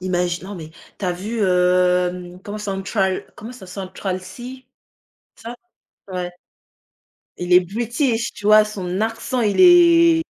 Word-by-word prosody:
imagine, 180 Hz, -1 st, -2 dB
non 205 Hz, -, -7 dB
mais 160 Hz, -4 st, -9 dB, 0.3 s
tu -, -, -5 dB
as 180 Hz, -, 0 dB
vu, 215 Hz, +6 st, -5 dB
hem, 180 Hz, 0 st, +1 dB
comment 205 Hz, +1 st, -7 dB
Central 195 Hz, -1 st, -2 dB
comment 225 Hz, +4 st, -9 dB
ça 245 Hz, -7 st, -12 dB
Central 185 Hz, 0 st, -5 dB
Cee, 245 Hz, +7 st, -10 dB, 0.7 s
ça, 230 Hz, +1 st, -8 dB, 0.5 s
ouais. 180 Hz, -1 st, -4 dB, 1.1 s
Il 175 Hz, 0 st, -3 dB
est 180 Hz, -, +8 dB
british, 230 Hz, -, -2 dB
tu 205 Hz, -, -7 dB
vois? 215 Hz, 0 st, +7 dB
Son 190 Hz, -3 st, -5 dB
accent, 225 Hz, +3 st, -2 dB
il 210 Hz, -, +1 dB
est 335 Hz, -2 st, +6 dB
195 Hz, 140 wpm, -20 LUFS, 180-230 Hz, 1.1 s, est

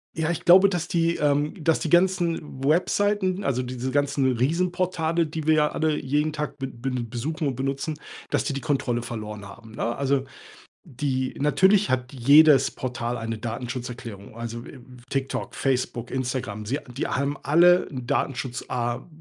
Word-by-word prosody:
Ja, 160 Hz, +1 st, 0 dB
ich 170 Hz, -, -5 dB
glaube, 185 Hz, +3 st, +8 dB
dass 175 Hz, -4 st, -2 dB
die, 170 Hz, 0 st, +1 dB
ähm 145 Hz, 0 st, +1 dB
dass 160 Hz, +1 st, +3 dB
die 160 Hz, -, -2 dB
ganzen 175 Hz, -5 st, +1 dB
Webseiten, 185 Hz, +5 st, +1 dB
also 130 Hz, -6 st, 0 dB
diese 125 Hz, +1 st, -4 dB
ganzen 140 Hz, -1 st, +1 dB
Riesenportale, 170 Hz, +3 st, 0 dB
die 155 Hz, 0 st, -5 dB
wir 160 Hz, -, +5 dB
ja 150 Hz, -1 st, +4 dB
alle 155 Hz, -1 st, 0 dB
jeden 150 Hz, +3 st, 0 dB
Tag 150 Hz, -1 st, -4 dB
b 135 Hz, -, -3 dB
b 130 Hz, +1 st, -5 dB
besuchen 130 Hz, +7 st, -3 dB
und 135 Hz, -, -2 dB
benutzen, 140 Hz, +4 st, -3 dB, 0.3 s
dass -, -, +1 dB
die -, -, -2 dB
die 135 Hz, -, -4 dB
Kontrolle 130 Hz, -5 st, 0 dB
verloren 105 Hz, -3 st, -6 dB
haben, 110 Hz, +3 st, -13 dB
ne? 115 Hz, +1 st, -2 dB
Also, 140 Hz, -1 st, +1 dB, 0.6 s
die 130 Hz, 0 st, -2 dB
natürlich 190 Hz, +8 st, +4 dB
hat 125 Hz, 0 st, -1 dB
jedes 140 Hz, +2 st, +6 dB
Portal 125 Hz, -1 st, -3 dB
eine 115 Hz, -1 st, -4 dB
Datenschutzerklärung, 120 Hz, -2 st, -6 dB
also, 115 Hz, 0 st, -6 dB
äh, 135 Hz, -, -11 dB, 0.3 s
TikTok, 135 Hz, -1 st, -3 dB
Facebook, 125 Hz, -3 st, -1 dB
Instagram. 125 Hz, -5 st, -3 dB
Sie 135 Hz, +7 st, -1 dB, 0.2 s
die 135 Hz, -, -1 dB
haben 140 Hz, +2 st, -1 dB
alle 175 Hz, +5 st, +5 dB
'n 130 Hz, -3 st, -6 dB
Datenschutza 120 Hz, -1 st, -2 dB
135 Hz, 160 wpm, -25 LUFS, 125-160 Hz, 0.6 s, glaube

